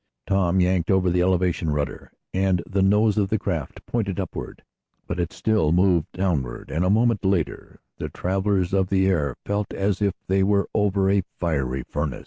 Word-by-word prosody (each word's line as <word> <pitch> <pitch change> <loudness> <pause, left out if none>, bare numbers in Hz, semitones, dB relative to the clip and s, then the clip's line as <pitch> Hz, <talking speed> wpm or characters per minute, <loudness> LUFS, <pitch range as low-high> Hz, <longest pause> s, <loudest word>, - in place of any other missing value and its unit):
Tom 95 -2 +2
yanked 90 -2 +1
over 95 -2 +3
the 90 0 +2
elevation 90 -2 +1
rudder, 75 -1 -3 0.2
and 95 -2 +1
the 100 0 0
nose 105 +2 +3
of 100 -2 +1
the 110 - +1
craft 80 -8 -4
pointed 100 -5 -2
upward. 95 - -6 0.4
But - - -4
it 85 -1 -1
still 105 -9 +1
moved 90 -2 +2
downward, 80 -11 -2
and, 80 +3 0
a 90 - +2
moment 115 +1 +2
later 95 -6 -1 0.2
the - - -4
travelers 95 0 -1
of 95 -1 +2
the 95 -1 +2
air 75 -9 +1
felt 100 0 -2
as 100 0 0
if 100 -2 +1
they 95 +1 +1
were 100 +1 +2
over 100 -2 +2
a 100 0 +3 0.2
fiery 70 -6 -1
furnace. 75 0 -3
95 Hz, 180 wpm, -24 LUFS, 85-100 Hz, 0.4 s, over